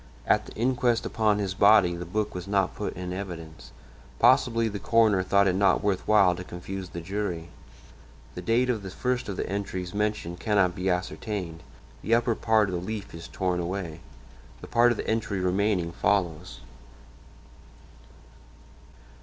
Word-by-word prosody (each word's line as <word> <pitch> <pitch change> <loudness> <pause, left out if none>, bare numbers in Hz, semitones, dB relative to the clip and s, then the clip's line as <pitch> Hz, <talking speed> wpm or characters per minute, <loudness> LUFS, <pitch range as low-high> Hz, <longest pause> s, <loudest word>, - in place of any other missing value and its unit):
At - - +2
the - - -10
inquest 120 0 +1
upon 105 -2 +1
his 100 -2 -2
body 100 -3 +5
the 85 0 -6
book 105 +3 -2
was 90 +1 -6
not 100 -2 +1
put - - -4
in 90 0 -5
evidence; 85 -4 -8 0.5
possibly 115 -1 +4
the 100 -2 -4
coroner 110 -2 +3
thought 100 +1 +3
it 95 - +2
not 100 +2 +2
worth 100 -3 -1
while 100 -4 +5
to 90 - -7
confuse 90 +1 -7
the 85 - -7
jury. 90 -2 -4 0.8
The 90 - -6
date 120 +7 +2
of 110 -4 -3
the 95 - -7
first 125 +4 -2
of 100 - -4
the - - -2
entries 95 -3 -4
mentioned 105 -4 -2
cannot 100 -3 +2
be 90 +2 -2
ascertained; 90 -1 -3 0.4
the 115 - +2
upper 120 0 +1
part 110 -2 +2
of - - -4
the 85 - -2
leaf 105 +2 -6
is 85 0 -8
torn 90 -2 -1
away; 85 -2 -4 0.6
the - - -10
part 120 +1 +4
of 120 - 0
the - - -5
entry 110 -3 -1
remaining 90 -1 0
follows 90 -3 -1
100 Hz, 165 wpm, -26 LUFS, 90-105 Hz, 0.8 s, body